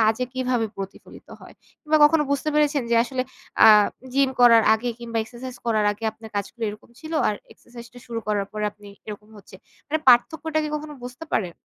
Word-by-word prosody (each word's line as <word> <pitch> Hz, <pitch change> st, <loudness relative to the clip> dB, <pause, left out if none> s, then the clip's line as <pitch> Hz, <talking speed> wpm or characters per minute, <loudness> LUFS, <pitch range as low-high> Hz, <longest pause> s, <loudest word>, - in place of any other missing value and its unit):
কাজে 225 Hz, +3 st, +2 dB
কিভাবে 255 Hz, -3 st, 0 dB
প্রতিফলিত 195 Hz, 0 st, -10 dB
হয়? -, -, -14 dB, 0.3 s
কিংবা 310 Hz, 0 st, +1 dB
কখনো 305 Hz, +1 st, +4 dB
বুঝতে 280 Hz, +2 st, -1 dB
পেরেছেন 295 Hz, -2 st, +2 dB
যে -, -, +3 dB
আসলে 255 Hz, +1 st, -3 dB, 0.4 s
আ -, -, +10 dB, 0.5 s
জিম 275 Hz, 0 st, +2 dB
করার 230 Hz, -2 st, +7 dB
আগে 240 Hz, +3 st, -3 dB
কিংবা 230 Hz, -1 st, -4 dB
এক্সারসাইজ 245 Hz, +2 st, -9 dB
করার 215 Hz, -2 st, +1 dB
আগে 210 Hz, +2 st, -10 dB
আপনার 220 Hz, 0 st, -13 dB
কাজগুলো 225 Hz, +3 st, -4 dB
এরকম 210 Hz, +3 st, -10 dB
ছিল। 315 Hz, +1 st, -9 dB, 0.2 s
আর 210 Hz, -, 0 dB, 0.2 s
এক্সারসাইজ 240 Hz, -1 st, -13 dB
টা 245 Hz, -, -11 dB
শুরু 230 Hz, -1 st, -4 dB
করার 205 Hz, -2 st, -1 dB
পরে 210 Hz, 0 st, -3 dB
আপনি 205 Hz, -1 st, -15 dB, 0.2 s
এরকম 210 Hz, 0 st, -9 dB
হচ্ছে। 195 Hz, -, -15 dB, 0.3 s
মানে 315 Hz, +2 st, 0 dB
পার্থক্যটা 310 Hz, +6 st, +3 dB
কি -, -, -3 dB
কখনো 300 Hz, 0 st, -6 dB
বুঝতে 250 Hz, +6 st, -8 dB
পারেন? 180 Hz, -5 st, -1 dB
240 Hz, 190 wpm, -23 LUFS, 215-275 Hz, 0.5 s, আ